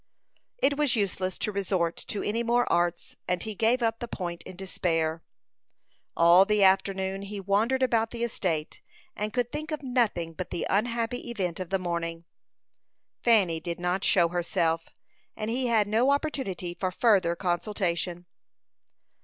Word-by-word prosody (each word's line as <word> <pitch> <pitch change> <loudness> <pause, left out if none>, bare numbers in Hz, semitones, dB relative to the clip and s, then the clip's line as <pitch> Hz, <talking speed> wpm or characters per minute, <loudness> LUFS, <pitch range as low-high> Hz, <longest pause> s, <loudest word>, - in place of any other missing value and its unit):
It 285 - +2
was 295 -4 +2
useless 190 -3 -1
to 210 - -2
resort 185 -4 0
to 205 - -3
any 220 +3 0
more 240 +1 +2
arts, 175 0 0
and 180 -1 0
he 220 - -4
gave 230 +4 +2
up 225 -1 0
the 240 - -4
point 175 -6 -5
in 185 - -9
despair. 165 -3 -1 1.0
All 170 +3 +7
the 210 0 +2
afternoon 190 0 +2
he 200 +1 -6
wandered 215 +7 +1
about 225 -3 +2
the 235 0 -4
estate, 170 -9 -2 0.3
and 210 +1 -3
could 245 0 -1
think 310 +1 -5
of 305 -2 -4
nothing 230 -10 0
but 185 +2 -6
the - - -3
unhappy 230 +3 -1
event 185 -7 -2
of 185 -2 -5
the 195 - +1
morning. 170 -2 -3 1.0
Fanny 195 -9 +4
did 170 +1 -5
not 180 +2 -1
show 170 -3 +4
herself, 170 -1 0 0.5
and 215 +1 -3
he 250 +1 0
had 225 -3 +3
no 225 +6 +3
opportunity 265 - -1
for 185 +1 -2
further 185 -5 +3
consultation. 175 -1 -1
195 Hz, 155 wpm, -27 LUFS, 175-230 Hz, 1.0 s, All